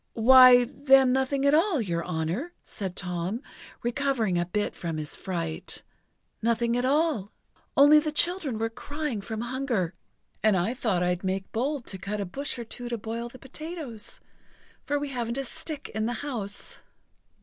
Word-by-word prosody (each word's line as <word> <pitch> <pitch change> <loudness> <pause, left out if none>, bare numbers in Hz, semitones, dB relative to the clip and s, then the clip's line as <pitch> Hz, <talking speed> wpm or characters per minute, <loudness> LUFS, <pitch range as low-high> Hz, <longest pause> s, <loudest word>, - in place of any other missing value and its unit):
"Why, 250 +1 +9
then, 270 0 +4
nothing 265 +1 +1
at 280 - +5
all, 330 0 +3
your 170 -6 -1
honour!" 180 - -2
said 190 -3 -5
Tom, 180 +6 -3 0.4
recovering 240 -5 0
a 175 - -1
bit 205 +3 -1
from 165 -2 -4
his 155 0 -5
fright, 165 -4 -5 0.6
"nothing 235 +1 +1
at 245 +1 +1
all! 280 - +1 0.5
Only 290 +2 +8
the 305 0 -2
children 335 -5 0
were 225 +1 -1
crying 290 -2 -4
from 220 +2 -5
hunger, 240 -8 -1 0.5
and 215 -3 +4
I 185 +7 +1
thought 215 -9 0
I'd 180 +1 0
make 190 0 -2
bold 265 +2 -1
to 190 - -5
cut 205 +2 -4
a 200 - -1
bush 270 +10 -4
or 240 - -4
two 240 +2 -7
to 235 - -2
boil 230 +2 -4
the 255 - -12
potatoes, 275 -4 -7 0.6
for 290 - 0
we 290 0 -3
haven't 240 -2 -3
a 275 - -1
stick 310 +2 -5
in 220 +1 -2
the 240 - -1
house." 205 -8 -6
235 Hz, 170 wpm, -27 LUFS, 200-275 Hz, 0.6 s, Why